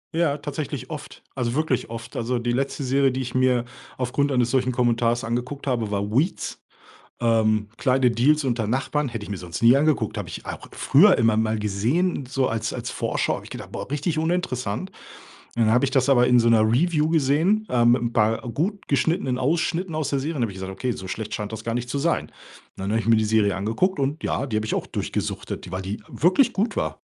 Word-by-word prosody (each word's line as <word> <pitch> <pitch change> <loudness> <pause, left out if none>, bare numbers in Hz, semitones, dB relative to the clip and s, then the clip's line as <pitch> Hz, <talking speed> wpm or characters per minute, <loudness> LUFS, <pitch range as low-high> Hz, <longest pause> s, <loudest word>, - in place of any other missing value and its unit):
Ja, 160 -4 +2
tatsächlich 145 0 -5
oft. - - -8
Also 120 0 -2
wirklich 155 -4 0
oft. 115 0 -8
Also 120 +2 -1
die 120 0 -1
letzte 135 +3 -1
Serie, 135 +1 +2
die 130 +1 -2
ich 125 -2 -5
mir 130 -2 +2 0.3
aufgrund 135 +3 0
eines 125 -3 +1
solchen 130 -1 +2
Kommentars 120 -1 +1
angeguckt 125 +5 -3
habe, 120 -6 -1
war 100 0 -2
„Weeds”, 145 - -1 0.6
ähm, 110 -2 +2
„Kleine 130 -2 +3
Deals 145 +6 +3
unter 120 -5 0
Nachbarn“. 135 +4 0
Hätte 115 -3 -5
ich - - -11
mir 100 -2 -4
sonst 85 -1 -6
nie 120 +3 +6
angeguckt. 140 -7 +1
Habe - - -4
ich - - -8
auch - - -7
früher 185 +8 +5
immer 115 -3 +3
mal 110 0 +1
gesehen, 125 - 0
so 135 0 0
als 115 -3 -2
als - - -4
Vorschau. - - -1
Habe - - -7
ich - - -13
gedacht: - - -8
„Boah, - - -6
richtig 150 +3 -1
uninteressant.” 160 - -2 0.6
Dann 115 -2 +2
habe 125 +4 +4
ich 135 - -1
das 130 -2 +2
aber 125 -3 +5
in 125 -1 +5
so 115 - +3
'ner 115 -2 +5
Review 150 +8 +2
gesehen, 165 +8 +2
äh, 120 -2 +3
mit 120 +1 +4
'n 120 0 -1
paar 110 0 +2
gut 195 - -2
geschnittenen 140 -2 +1
Ausschnitten 165 +5 0
aus 155 -2 -1
der 140 - +1
Serie. 150 +5 -3
Und 140 - -3
da - - +3
habe 105 - -7
ich - - -12
gesagt: 95 0 -5
„Okay, 125 +6 -3
so 95 -5 -5
schlecht 105 +3 -5
scheint 105 0 -4
das 110 -1 -6
gar 115 +1 -3
nicht 120 0 -3
zu 140 - -2
sein.” 165 +4 0 0.5
Dann 95 +1 -4
habe 110 - +2
ich - - -6
mir 115 0 +5
die 110 - +2
Serie 105 -2 +2
angeguckt. 115 - 0
Und 140 +4 -2
ja, 135 - -1
die 110 - -2
habe 110 0 -1
ich - - -1
auch - - -3
durchgesuchtet, - - -4
die 90 - -9
weil 95 +1 -4
die 95 +3 -5
wirklich 185 - +3
gut 215 +4 -1
war - - -2
125 Hz, 230 wpm, -24 LUFS, 115-145 Hz, 0.6 s, nie